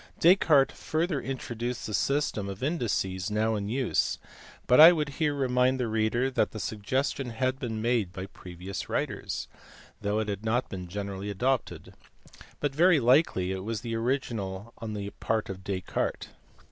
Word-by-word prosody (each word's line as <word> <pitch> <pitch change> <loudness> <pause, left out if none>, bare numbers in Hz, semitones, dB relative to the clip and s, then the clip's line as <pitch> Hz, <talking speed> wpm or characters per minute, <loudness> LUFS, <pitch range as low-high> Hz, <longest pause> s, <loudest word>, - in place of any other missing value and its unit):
Descartes 160 -6 +5
further 160 -2 -1
introduced 120 -2 -4
the 105 - -5
system 135 -6 0
of 100 +5 -7
indices 100 - -1
now 110 +1 +1
in 100 -1 -2
use, 130 +1 0 0.5
but 125 - +5
I 160 +3 +12
would 155 -4 0
here 150 +1 0
remind 130 -1 +2
the 125 - 0
reader 110 +4 +1
that - - +1
the 110 - -5
suggestion 125 +6 -2
had 130 +3 -1
been 110 -3 -3
made 115 -6 +1
by 95 +1 -6
previous 90 0 -8
writers, - - -2 0.5
though 105 +1 0
it 110 -1 -1
had 100 0 -4
not 120 +3 0
been 90 -2 -6
generally 100 +1 -5
adopted; 125 +6 -1 0.7
but 145 -2 -1
very 170 +2 +5
likely 120 - +3
it 95 0 -4
was 110 +2 -4
original 115 -3 -2
on 110 -1 -5
the 100 0 -4
part 110 -3 -1
of 95 0 -9
Descartes. 95 -1 -3
115 Hz, 160 wpm, -28 LUFS, 100-135 Hz, 0.7 s, I